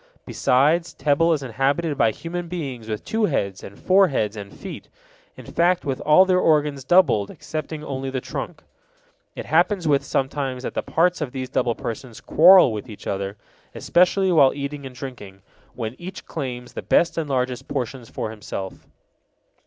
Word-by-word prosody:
Besides, 155 +7 +2
Tebel 155 +3 +2
is 150 -4 0
inhabited 140 +6 0
by 140 -5 +3
human 170 +9 -5
beings 140 -10 -5
with 110 -1 -4
two 220 0 +1
heads 100 - -2
and 100 - -10
four 190 +1 +4
hands 110 - -1
and 100 -2 -8
feet, 195 - -9 0.5
in - - -11
fact 175 +1 +1
with 135 -2 -2
all 155 +5 +6
their 185 -1 +3
organs 150 -5 +2
doubled 130 - +3
excepting 155 0 -6
only 135 -2 -4
the 130 0 -2
trunk. - - -6 0.7
It - - -6
happens 175 +2 +2 0.2
sometimes 135 -1 -2
that - - -4
the - - -1
parts 175 +1 +1
of 140 -5 -3
these 130 -1 -4
double 120 -2 0
persons 115 0 -6
quarrel 175 -6 +6
with 110 +3 -6
each 105 - -11
other, 100 +1 -3 0.4
especially 185 +2 +2
while 140 -6 +5
eating 140 0 -5
and 130 - -12
drinking, 105 -8 -9 0.3
when 115 -1 -4
each 180 +2 -8
claims 125 -5 -6
the - - -5
best 170 - +2
and 160 -3 -3
largest 130 -1 -2
portions 125 -3 -4
for 110 - -4
himself. 100 -3 -7
140 Hz, 170 wpm, -23 LUFS, 125-170 Hz, 0.7 s, all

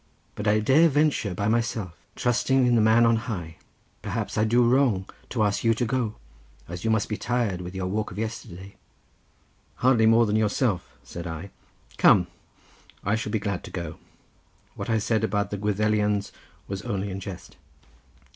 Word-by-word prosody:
But 105 - -4
I 105 +1 +4
dare 150 +9 +5
venture 145 - +1
by 100 +3 -1
myself, 110 -5 -1 0.2
trusting 125 +2 +2
in 120 - +3
the 115 - +4
Man 110 +2 +5
on 115 0 +4
High, 90 -9 -5
and - - -36
perhaps 105 0 -3
I 110 - +2
do 120 +2 +3
wrong 120 -7 +2 0.2
to 115 -4 0
ask 100 -1 0
you 115 -1 +3
to 120 - 0
go, 120 -2 -1 0.5
as 85 +1 -7
you 110 - 0
must 110 -2 +1
be 105 - -3
tired 120 -7 -1
with 90 +1 -7
your 95 -1 -2
walk 105 +3 -2
of 95 - -10
yesterday." 105 -4 -6 1.0
"Hardly 125 -3 +3
more 115 +1 +5
than 105 -1 0
yourself," 105 -2 0
said 85 0 -7
I. 80 +4 -7 0.5
"Come; 90 -3 +6 0.8
I 100 - 0
shall 110 -1 -2
be 110 - +1
glad 100 -3 -3
to - - -8
go. 85 -3 -6 0.8
What - - -6
I 115 - +2
said 110 +1 0
about 105 -2 0
the 105 - -2
Gwyddelians 105 0 0 0.4
was 100 -1 -4
only 100 -4 -3
in 95 - -5
jest." 95 -2 -9
105 Hz, 180 wpm, -25 LUFS, 100-115 Hz, 1.0 s, Come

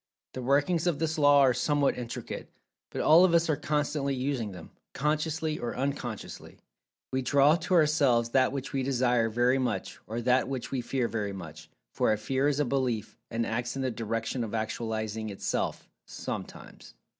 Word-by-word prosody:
The 130 - -5
workings 145 +7 +2
of 170 -5 +1
this 160 0 -1
Law 145 -1 +6
are 130 -2 +5
somewhat 145 +3 +1
intricate, 120 -2 -6 0.4
but - - -3
all 165 +4 +7
of 175 -2 +4
us 165 -1 +3
are - - +2
constantly 145 -1 -1
using 130 -5 -2
them, 90 -3 -11 0.2
consciously 155 +1 -1
or 120 - -4
unconsciously. 130 -5 -4 0.5
We 130 - 0
draw 140 +4 +4
to 185 +1 0
ourselves 140 -8 +3
that 130 0 +3
which 135 -1 -5
we 135 - 0
Desire 125 -3 +2
very 120 +4 +2
much, 110 -7 -2
or 115 +2 -3
that 125 +2 +2
which 130 -3 -4
we 130 - -1
Fear 125 0 -1
very 105 -3 -3
much, 80 -5 -9 0.2
for - - +2
a 110 - +2
Fear 130 +6 0
is 145 -1 +1
a 150 - +2
Belief, 125 -4 -1
and 115 0 -1
acts 120 +2 -2
in 135 - -2
the 130 - 0
direction 115 +2 -2
of 115 0 -4
actualizing 110 -1 -3
itself, 100 - -3 0.2
sometimes. - - -8
130 Hz, 180 wpm, -29 LUFS, 115-145 Hz, 0.5 s, all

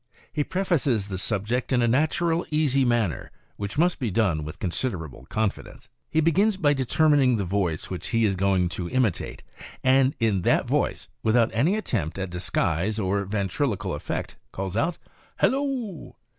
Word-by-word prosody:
He 150 - +1
prefaces 145 - 0
the 95 -2 -3
subject 110 +6 -1
in 125 -2 +3
a - - +3
natural, 160 +6 +1
easy 145 -3 +2
manner, 120 - 0 0.3
which 100 +3 -5
must 175 +3 +2
be 125 -5 -1
done 90 -7 +1
with 75 0 -7
considerable 85 - -3
confidence. 110 -2 -3 0.2
He 160 - +2
begins 190 +6 +3
by 150 -6 +3
determining 135 -1 +3
the 100 -3 -1
voice 90 -4 -1
which 90 -3 -4
he 115 -1 +2
is 100 -2 +1
going 95 -2 +2
to 90 -1 -4
imitate, 125 -8 -1 0.4
and 130 +1 +4
in 110 -5 +2
that - - +2
voice, - - 0
without 115 +1 +3
any 150 - +2
attempt 105 - -2
at 95 -2 -4
disguise 90 +2 -1
or 100 -1 0
ventriloquial 100 +4 -1
effect, - - -4
calls 95 0 -4
out 165 +10 0 0.4
"Hallo!" 260 - -1
115 Hz, 155 wpm, -25 LUFS, 95-145 Hz, 0.4 s, and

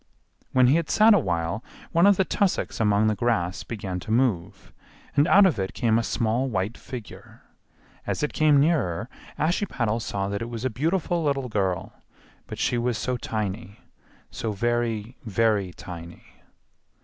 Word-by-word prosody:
When 130 -1 +5
he 135 +6 +5
had 165 -2 -2
sat 220 +1 +6
a 205 - +5
while 85 - -2 0.3
one 170 +3 +5
of 200 -2 +5
the 190 - +2
tussocks 195 0 0
among 105 -1 +3
the 110 - +3
grass 100 -5 0
began 100 -5 -5
to 90 - -10
move, 110 -6 0 0.4
and 145 +2 +4
out 200 +2 +7
of 170 - +2
it 95 0 -3
came 115 -2 +2
a - - -1
small 115 +4 0
white 100 0 -2
figure; 125 -5 -10 0.6
as - - -2
it 150 - -1
came 150 -2 +4
nearer 125 - +1 0.3
Ashiepattle 155 - 0
saw 100 -3 -3
that 100 +1 -3
it 115 - -4
was 120 +1 -5
a 130 - 0
beautiful 165 - 0
little 135 -3 -1
girl, 95 -5 -1 0.5
but - - -7
she 120 - 0
was 120 -1 0
so 125 +2 -1
tiny, 105 -2 -4 0.5
so 110 -2 -3
very, 120 +1 -1
very 105 -3 +1
tiny. 85 -1 -10
115 Hz, 165 wpm, -25 LUFS, 100-140 Hz, 0.6 s, out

